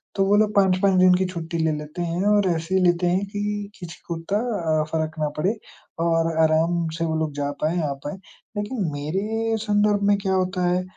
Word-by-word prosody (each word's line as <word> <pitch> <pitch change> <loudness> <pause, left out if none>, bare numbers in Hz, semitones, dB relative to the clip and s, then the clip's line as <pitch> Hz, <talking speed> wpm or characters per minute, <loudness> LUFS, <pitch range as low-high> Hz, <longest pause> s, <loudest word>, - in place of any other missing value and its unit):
तो 195 - +2
वो 200 +1 +4
लोग 210 0 +2
5-5 190 0 +3
दिन 185 0 +6
की 190 - +1
छुट्टी 170 -1 -4
ले 160 -1 +1
लेते 150 +4 -7
हैं 170 +2 -1
और 205 -2 +4
ऐसे 170 +3 0
लेते 175 0 +3
हैं 185 +3 +1
कि, 205 0 -4
किसी 175 -1 -9
को 170 - -3
इत्ता 195 +5 -1 0.4
अ, - - +1
फ़र्क 160 0 -2
ना 150 -1 0
पड़े 195 +8 0 0.4
और 165 0 +2
आराम 165 +2 +2
से 165 - -1
वो 160 -1 -1
लोग 155 -2 -2
जा 145 0 -2
पाएँ, 160 +3 +1
आ 140 -2 -1
पाएँ। 145 +6 -7 0.4
लेकिन 205 -3 -2
मेरे 210 +10 -1
संदर्भ 205 -1 +2
में 200 - +4
क्या 190 -1 0
होता 185 0 0
है 180 +1 +2
180 Hz, 210 wpm, -23 LUFS, 165-200 Hz, 0.4 s, दिन